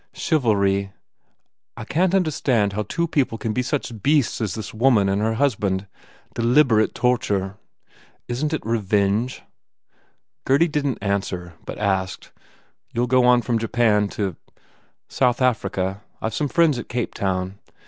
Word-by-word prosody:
Chiv 155 -4 0
alry... 100 -4 +1 0.9
I - - -6
can 180 +4 +1
t 190 - +3
understand 130 - +1
how 105 - -1
two 170 - -2
people 135 -7 0
can 110 0 -3
be 125 - 0
such 125 -4 -3
beasts 145 -3 +2
as 105 -4 -2
this 110 -3 -6
woman 115 -3 +3
and 100 +1 0
her 110 +1 0
hus 140 +2 +2
band.... 100 -2 -2 0.5
Deliberate 120 -1 +3
torture.... 105 -6 0 0.7
Isn 125 +5 -1
t 160 - -1
it 150 - -7
revenge?" 105 +1 0 1.0
Gurdy 140 +6 +3
didn 145 -5 -1
t - - -21
answer 95 -3 -2
but - - -6
asked, 95 -2 -2 0.6
"You 120 - 0
ll - - +3
go 125 0 +3
on 125 -1 +5
from 120 -2 0
Japan 110 -2 +2
to 95 -5 -1 0.4
" - - -34 0.2
"South 125 -2 +1
Africa. 100 -6 0 0.2
I 110 - -2
ve - - -12
some 145 +6 0
friends 155 -3 +3
at - - -8
Cape 120 -1 -2
town 95 0 -2
115 Hz, 165 wpm, -22 LUFS, 100-130 Hz, 1.0 s, on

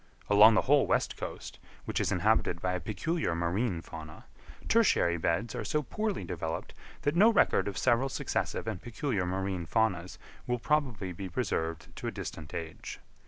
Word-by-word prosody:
Along 105 +2 +8
the - - +3
whole 140 +1 +4
west - - +1
coast, - - -7 0.3
which - - -1
is - - 0
inhabited 85 - +2
by 90 +1 -1
a 90 - -1
peculiar 110 - -1
marine 85 +2 -1
fauna, 80 -1 -10 0.4
tertiary 195 - +3
beds 85 +8 0
are - - -3
so 150 -1 0
poorly 215 - -2
developed 80 -2 -4 0.3
that 145 +2 +1
no 215 +6 +7
record 220 - +3
of 100 - -4
several 130 +2 +2
successive - - -2
and 110 -6 -4
peculiar 110 -5 -2
marine 95 -2 -2
faunas 95 -5 0 0.3
will 125 0 +1
probably 120 -9 0
be 95 +2 -6
preserved 80 -1 -3
to - - -4
a - - -1
distant 75 -2 -7
age. 80 -1 -6
100 Hz, 165 wpm, -30 LUFS, 85-130 Hz, 0.4 s, Along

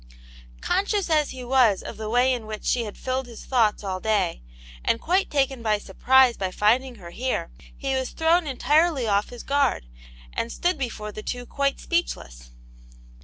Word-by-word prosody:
Conscious 400 -2 0
as 305 -2 +3
he 255 -1 -7
was 245 -5 +3
of - - -8
the 215 -1 -5
way 250 +3 +3
in 230 -3 -5
which 215 -1 -7
she 240 -2 +1
had 210 - -8
filled 260 0 -2
his 230 -2 -11
thoughts 225 -5 +2
all 190 -2 -3
day, 200 - 0 0.4
and 230 - +1
quite 370 +8 +1
taken 270 -3 0
by 215 -2 +2
sur 200 -1 -12
prise 260 0 +5
by 190 -1 -2
finding 240 +7 +1
her 175 -5 -11
here, 245 -6 -2 0.3
he 270 -1 -2
was 260 -1 -1
thrown 325 0 +2
entirely 295 +1 +2
off 205 -1 +1
his 245 -1 -9
guard, 280 - +1 0.5
and 230 - -2
stood 355 -3 -1
before 215 -5 -4
the 215 - -7
two 245 +3 -5
quite 275 +2 -1
speechless. - - -3
245 Hz, 180 wpm, -24 LUFS, 215-275 Hz, 0.5 s, prise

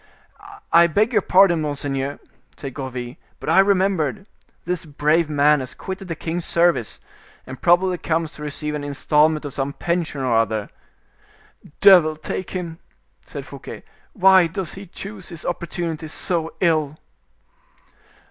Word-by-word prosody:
"I 170 0 +7
beg 210 +8 +1
your - - +4
pardon, 185 -3 +4
monseigneur!" 140 -2 -3 0.4
said 135 -3 -7
Gourville, 125 -2 -6 0.2
"but - - -5
I - - +4
have 195 +1 +6
remembered; 190 -2 +1 0.4
this 180 0 -2
brave 155 +1 +1
man 150 0 +4
has 130 -1 -7
quitted 190 0 -7
the 165 - -4
king's 170 +2 -4
service, 170 -11 +1 0.5
and 130 0 -9
probably 180 +1 +3
comes 165 -1 -1
to - - -13
receive 150 0 -4
an 150 -1 -4
installment 150 +2 +1
of 140 - -6
some 140 0 -2
pension 170 -4 -2
or 125 -3 +1
other." 110 -2 0 1.1
"Devil 180 -6 +7
take 155 +4 -5
him!" 170 -3 -5 0.4
said - - -8
Fouquet, - - -10 0.3
"why 190 -4 +6
does 175 0 -5
he 195 0 -10
choose 195 +1 -9
his 170 -2 -7
opportunity 170 -2 -4
so 165 +1 -2
ill?" 155 -4 +1
160 Hz, 145 wpm, -21 LUFS, 145-180 Hz, 1.1 s, I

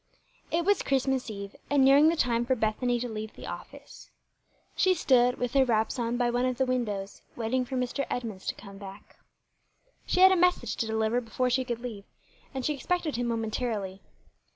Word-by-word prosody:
IT 335 +1 0
was 405 +1 +3
Christmas 265 -2 0
eve, 200 -1 -7
and 280 -2 +4
nearing 280 +3 +7
the 335 - +1
time 240 -6 +1
for 260 +2 +1
Bethany 240 +2 0
to 245 - -3
leave 220 -1 -6
the - - -9
office. - - -10 0.7
She 375 -1 +3
stood, 250 -5 +3
with 245 -1 -2
her 275 -1 +5
wraps 225 0 0
on, 235 0 -1
by 240 -1 +1
one 245 +1 +1
of 255 -1 -1
the 265 - +2
windows, 210 -6 -3
waiting 245 +2 -1
for 260 - -5
Mr. 250 +2 -2
Edmunds 220 -6 -5
to - - -1
come 200 -1 -12
back. 195 0 -11 0.9
She 365 - +2
had 380 0 +9
a - - +5
message 355 - +2
to 225 - -1
deliver 220 +2 0
before 250 +2 -1
she 260 +1 +2
could 240 -2 -4
leave, 220 -5 -7 0.5
and 265 -2 -4
she 300 - +1
expected 315 +3 -2
him 240 0 -1
momentarily. 220 -4 -2
245 Hz, 195 wpm, -28 LUFS, 220-265 Hz, 0.9 s, had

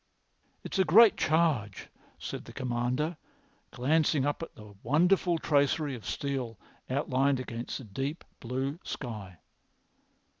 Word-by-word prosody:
"It's - - -3
a - - +6
great 205 +6 +7
charge," 155 - +1 0.3
said - - -6
the - - -11
Commander, 125 +6 -1 0.5
glancing 145 +2 +2
up 145 +2 -1
at 165 - -7
the 105 -1 -12
wonderful 175 - +3
tracery 145 -1 +1
of 110 -6 -8
steel 130 -6 -3 0.3
outlined 135 0 +1
against 120 -1 -5
the - - -9
deep 135 - -4 0.2
blue 135 +6 -3
sky. 105 - -6
135 Hz, 120 wpm, -30 LUFS, 120-155 Hz, 0.5 s, great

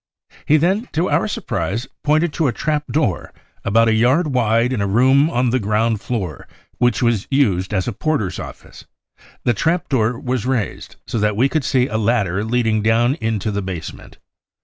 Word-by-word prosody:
He 155 - +5
then 190 - 0
to 165 +4 0
our - - +2
surprise 115 +6 -3 0.2
pointed 155 +2 +2
to 160 -4 +1
a - - +1
trap 150 +3 -2
door 130 - -1 0.3
about 115 +3 +3
a 110 - +3
yard 130 +7 +2
wide 120 0 +2
in 115 - -1
a 100 - 0
room 130 +8 +4
on 125 -5 +1
the 130 - +1
ground 110 +1 0
floor 95 - -4 0.3
which 120 +1 +2
was 115 -4 +1
used 100 -10 +1
as 95 -3 -1
a 120 - -2
porter's 110 - -2
office; - - -10 0.6
the 120 - +2
trap 165 - 0
door 120 -3 +1
was 125 -2 -2
raised, 120 -7 -3
so 115 - -3
that 105 0 0
we 130 +4 +4
could 155 +1 -1
see 125 -1 +2
a 110 -4 -2
ladder 105 -4 +1
leading 110 -1 +1
down 115 +4 +2
into 110 -2 -1
the 100 0 -2
basement. 90 -5 -7
120 Hz, 185 wpm, -19 LUFS, 105-135 Hz, 0.6 s, He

